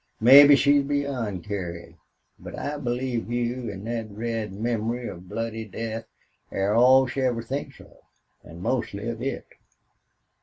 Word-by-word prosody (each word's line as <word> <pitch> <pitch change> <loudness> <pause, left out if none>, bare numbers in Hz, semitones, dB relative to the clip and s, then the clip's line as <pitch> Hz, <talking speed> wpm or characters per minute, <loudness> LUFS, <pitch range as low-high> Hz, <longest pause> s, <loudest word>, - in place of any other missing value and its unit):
Mebbe 140 +5 +9
she's 140 +2 +4
beyond 135 -10 -2
carin'. 85 -4 -6 0.4
But - - -9
I 150 +1 -4
believe 120 -3 -3
you 120 0 -2
an' 100 +1 -9
thet 115 -1 -4
red 110 0 -4
memory 115 +3 -2
of 90 0 -9
bloody 115 +1 -4
death 110 +1 -6 0.4
air 100 +2 0
all 130 +3 +6
she 130 +1 -3
ever 120 -3 0
thinks 135 +5 -5
of. - - -17 0.4
An' 85 +2 -11
mostly 110 -3 -2
of 115 0 -4
it." 135 +2 -3
115 Hz, 145 wpm, -25 LUFS, 105-130 Hz, 0.4 s, Mebbe